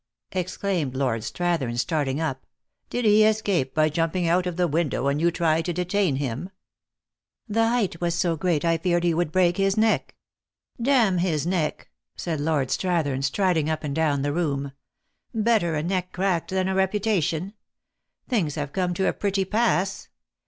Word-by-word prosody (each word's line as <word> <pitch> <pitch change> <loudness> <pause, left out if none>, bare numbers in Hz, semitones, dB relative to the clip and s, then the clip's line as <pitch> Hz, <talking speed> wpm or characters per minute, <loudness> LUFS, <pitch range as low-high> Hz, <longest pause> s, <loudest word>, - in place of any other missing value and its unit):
exclaimed 185 -6 -2
Lord 130 -4 0
Strathern, 130 +1 -1
starting 145 0 0
up. 135 -5 -3 0.2
" - - -52
Did 245 -1 -2
he 215 0 +6
escape 205 -11 +1
by 155 0 +3
jumping 165 +3 0
out 180 +2 +2
of 180 -1 -4
the 180 -1 +2
window, 155 -4 0
and 140 +2 0
you 170 - +4
try 165 -2 +1
to 175 +2 -3
detain 180 -2 0
him 135 +5 -3 0.3
?" - - -66
" - - -62
The 225 +1 +2
height 225 -8 0
was 170 -1 0
so 175 -1 +1
great, 160 -1 0
I 165 -1 +2
feared 175 0 +1
he 170 -1 +2
would 170 -1 0
break 175 0 +2
his 195 +1 +1
neck." 220 0 +1 0.3
" - - -20
Damn 230 -8 +3
his 160 -5 0
neck 170 -4 -2
!" - - -65
said 165 -4 -3
Lord 145 -4 0
Strathern, 160 -8 0
striding 160 +1 +1
up 155 0 -2
and 145 -2 -3
down 150 -4 +1
the 145 0 0
room. 140 -5 -1 0.4
" - - -49 0.2
Better 215 -7 +2
a 150 - -1
neck 180 +1 -2
cracked 185 -3 0
than 185 0 0
a 190 - 0
reputation. 190 -2 0 0.7
Tilings 185 - 0
have 145 -2 -4
come 180 -2 -1
to 190 - +1
a - - +1
pretty 195 -1 -1
pass. 200 -2 0
175 Hz, 190 wpm, -25 LUFS, 155-190 Hz, 0.7 s, he